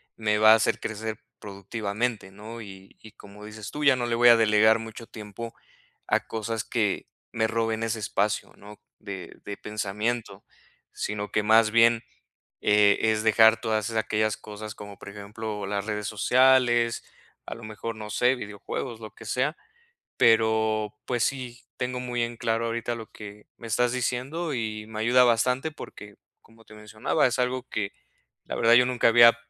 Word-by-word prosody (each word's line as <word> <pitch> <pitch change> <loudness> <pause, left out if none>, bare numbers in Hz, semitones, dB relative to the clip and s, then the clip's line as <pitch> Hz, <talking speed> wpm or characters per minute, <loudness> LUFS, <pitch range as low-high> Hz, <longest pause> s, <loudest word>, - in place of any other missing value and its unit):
me 105 -1 0
va 110 +1 +8
a - - +8
hacer 110 - +1
crecer 110 0 -5 0.2
productivamente, 100 +1 -4
¿no?, 110 +4 -9
y 95 -2 -12
y 110 - -13
como 105 +1 -13
dices 105 -1 -8
tú: 150 - -5
"Ya 140 -2 +6
no 120 - -1
le 120 - 0
voy 120 +1 +6
a 115 - +8
delegar 110 0 +4
mucho 115 +1 -9
tiempo 110 +2 -8 0.5
a - - +2
cosas 110 0 -3
que 105 -5 -1 0.2
me 110 -1 0
roben 115 0 -1
ese 115 -1 -2
espacio", 105 - -1
¿no?, 105 +1 -13 0.2
de 95 -2 -8
de 100 - -6
pensamiento, 105 +3 -3 0.5
sino 105 0 -4
que 105 - +1
más 110 0 +5
bien, 115 0 +5 0.6
eh, 105 -1 +4
es 110 0 -1
dejar 110 +1 +5
todas 110 -1 -1
es 115 - -6
aquellas 110 -1 0
cosas 105 0 -9
como 100 -1 -10
por - - -12
ejemplo, 105 +1 -6
las 100 -1 -2
redes 105 -1 -3
sociales, 120 +1 +3 0.4
a - - -6
lo 115 - -12
mejor, 110 +1 -6
no 105 -1 -8
sé, 125 +4 +2
videojuegos, 110 +2 -6
lo 110 -2 -9
que 115 - -12
sea, 135 +8 0 0.6
pero, 110 -1 +3
pues 120 -2 0
sí, 125 -3 -4
tengo 125 0 -3
muy 120 -1 -2
en 115 0 -3
claro 115 +1 -1
ahorita 115 +1 -2
lo 115 -2 -9
que 105 0 -11
me 115 - -10
estás 120 +2 +1
diciendo, 135 +6 -2
y 110 -2 -4
me 110 -1 -6
ayuda 125 +3 +5
bastante 125 +5 +1
porque, 105 -7 -11 0.3
como 115 0 -21
te 110 - -15
mencionaba, 105 +2 0
es 125 0 -1
algo 125 +1 -1
que 100 -2 -3 0.5
la - - -5
verdad, 115 +1 +5
yo 125 - +7
nunca 125 -2 +2
había 115 0 +7
110 Hz, 175 wpm, -26 LUFS, 105-120 Hz, 0.6 s, va